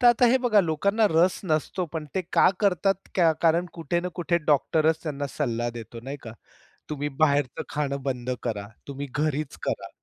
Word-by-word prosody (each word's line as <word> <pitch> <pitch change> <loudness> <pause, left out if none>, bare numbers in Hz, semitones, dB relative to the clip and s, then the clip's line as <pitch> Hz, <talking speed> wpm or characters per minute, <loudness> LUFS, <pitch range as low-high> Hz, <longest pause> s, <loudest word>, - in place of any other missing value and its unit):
तर 245 - +5
आता 240 +1 +6
हे 245 - +5
बघा 235 -5 +4
लोकांना 200 +6 +2
रस 170 +3 +3
नसतो. 160 +2 0
पण 160 -2 -3
ते 190 - 0
का - - +6
करतात 195 0 +1
का 170 -3 +4
कारण 170 +2 +3
कुठे 170 +1 -1
ना 180 - -3
कुठे 170 0 +1
डॉक्टरच 155 +2 +2
त्यांना 145 -3 -3
सल्ला 120 -5 -2
देतो 115 0 -9
नाही 140 +2 -5
का? 115 - -8 0.6
तुम्ही 145 0 -2
बाहेरचं 140 -4 +2
खाणं 140 -2 -2
बंद 125 -2 -3
करा, 105 -4 -3 0.2
तुम्ही 140 +1 -5
घरीच 150 - -1
करा. - - -2
155 Hz, 180 wpm, -26 LUFS, 140-180 Hz, 0.6 s, आता